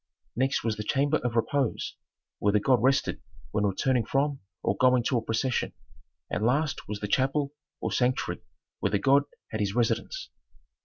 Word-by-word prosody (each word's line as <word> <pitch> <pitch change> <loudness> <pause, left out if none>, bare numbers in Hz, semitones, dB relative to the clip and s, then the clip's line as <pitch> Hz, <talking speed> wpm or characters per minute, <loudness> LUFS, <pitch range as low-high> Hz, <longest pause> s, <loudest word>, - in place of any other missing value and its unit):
Next 130 +4 +1
was 110 -2 -1
the 105 - -3
chamber 140 +7 +2
of 125 -4 -3
"repose," 135 +2 0 0.4
where 100 - +3
the 105 - +4
god 125 +1 +3
rested 130 +2 +2 0.3
when 105 -1 +1
returning 120 +5 +1
from 135 +4 0 0.2
or - - +1
going 125 -1 +4
to 125 +1 +1
a - - -6
procession, 115 +3 -1 0.5
and 105 - -2
last 140 +6 +1
was 105 0 -5
the 105 - -2
chapel 135 +5 +1 0.3
or - - -1
sanctuary 125 0 0 0.4
where - - +1
the 105 - +2
god 140 +7 +4 0.3
had 110 - -3
his 100 -1 -1
residence. 125 - -1
125 Hz, 170 wpm, -28 LUFS, 110-135 Hz, 0.5 s, the